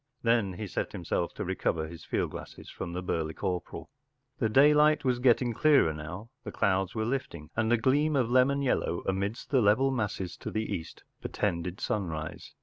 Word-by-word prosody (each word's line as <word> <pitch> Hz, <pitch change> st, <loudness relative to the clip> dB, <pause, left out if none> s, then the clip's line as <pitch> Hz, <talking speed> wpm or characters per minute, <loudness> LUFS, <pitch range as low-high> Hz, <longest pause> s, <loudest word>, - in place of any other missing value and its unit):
Then 115 Hz, -5 st, +2 dB
he 105 Hz, +4 st, -5 dB
set 100 Hz, -, -3 dB
himself 85 Hz, -2 st, -2 dB
to -, -, -4 dB
recover 85 Hz, -3 st, -1 dB
his 85 Hz, 0 st, -10 dB
fidd -, -, -1 dB
glasses -, -, -9 dB
from 85 Hz, -, -6 dB
the 90 Hz, +1 st, -4 dB
burly 80 Hz, -3 st, -2 dB
corporal.... 90 Hz, -1 st, -4 dB, 0.5 s
The 110 Hz, -, +1 dB
daylight 150 Hz, +4 st, +5 dB
was 125 Hz, -2 st, +2 dB
getting 125 Hz, -1 st, +3 dB
clearer 140 Hz, -, +4 dB
now. 85 Hz, +10 st, -8 dB
The -, -, -6 dB
clouds 95 Hz, 0 st, 0 dB
were 110 Hz, -1 st, -1 dB
lifting, 85 Hz, -, -4 dB
and 110 Hz, +1 st, +1 dB
a 120 Hz, -, +5 dB
gleam 145 Hz, +6 st, +2 dB
of 125 Hz, -4 st, +1 dB
lemon 135 Hz, +2 st, +3 dB
yellow 105 Hz, -9 st, 0 dB
amidst 100 Hz, +4 st, -2 dB
the 135 Hz, -3 st, +4 dB
level 120 Hz, +6 st, +4 dB
masses 100 Hz, -7 st, -3 dB
to -, -, -6 dB
the 110 Hz, 0 st, -2 dB
east 80 Hz, -, -6 dB, 0.2 s
portended 90 Hz, -1 st, -2 dB
sunrise. 80 Hz, -7 st, -4 dB
105 Hz, 180 wpm, -29 LUFS, 90-130 Hz, 0.5 s, daylight